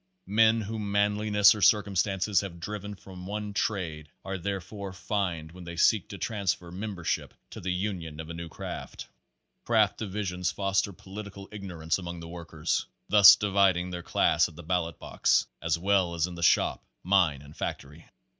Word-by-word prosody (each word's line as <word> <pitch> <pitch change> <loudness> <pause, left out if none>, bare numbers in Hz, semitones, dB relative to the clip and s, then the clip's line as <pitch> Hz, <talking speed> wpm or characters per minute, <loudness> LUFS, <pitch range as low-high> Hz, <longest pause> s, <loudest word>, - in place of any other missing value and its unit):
Men 110 +3 +4
whom 105 -1 -4
manliness 105 0 +4
or 105 - -6
circumstances 100 0 +3
have 90 -4 -7
driven 105 +3 -5
from 95 -2 -11
one 105 0 -4
trade 80 -8 -2 0.2
are 95 -1 -4
thereby 100 +2 -4
fined 90 -4 -2
when 90 +1 -11
they 85 0 -7
seek 95 +3 +3
to 100 - -7
transfer 95 -5 -2
member 95 -1 -6
ship - - -2 0.2
to - - -8
the 95 - -3
union 90 -4 -3
of 80 - -6
a 85 - -6
new 85 0 -7
craft. - - -7 0.6
Craft - - +2
divisions 95 -4 -2
foster 100 0 0
political 100 +1 -9
ignorance 90 -5 -3
among 85 -1 -6
the 85 - -8
workers, 85 -2 -3 0.2
thus 100 -1 +10
dividing 95 -3 +2
their 90 -1 -5
class 85 - +2
at 80 - -16
the 85 - -10
ballot 85 -1 -1
box, - - +1 0.2
as 85 -1 +1
well 95 -1 +2
as 85 -1 +1
in 90 - -7
the 85 - -8
shop, 85 - +3 0.2
mine 90 -7 +2
and 75 +1 -14
factory. 75 +4 -6
95 Hz, 170 wpm, -28 LUFS, 85-100 Hz, 0.6 s, thus